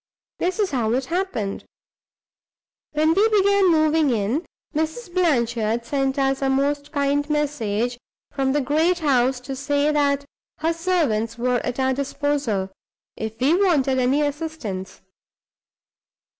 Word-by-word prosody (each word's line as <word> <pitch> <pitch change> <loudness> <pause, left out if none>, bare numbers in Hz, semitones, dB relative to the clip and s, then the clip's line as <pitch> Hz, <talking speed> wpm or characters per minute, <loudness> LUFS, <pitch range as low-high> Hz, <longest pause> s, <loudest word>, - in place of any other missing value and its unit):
This 365 +4 -1
is 415 -3 0
how 235 -5 0
it 260 +1 0
happened. 330 - -2 1.3
When 310 +2 +3
we 415 +5 +4
began 400 -2 +4
moving 310 -2 +3
in, 235 - -1 0.3
Mrs. 320 +6 -3
Blanchard 235 -9 +1
sent 270 0 -1
us 270 0 +1
a 270 - +1
most 285 +2 0
kind 285 0 0
message 245 -6 -1 0.3
from 270 -1 0
the 290 +1 +1
great 315 +6 +2
house 265 -5 +2
to 270 +2 -6
say 285 +2 +1
that 285 -1 +1 0.3
her 325 +2 0
servants 305 -11 0
were 250 +1 +1
at 250 +2 -4
our 260 0 +2
disposal, 275 -7 -1 0.4
if 220 0 -6
we 275 +5 +3
wanted 275 -8 +2
any 265 +4 +2
assistance. 290 - -4
280 Hz, 130 wpm, -23 LUFS, 250-315 Hz, 1.3 s, we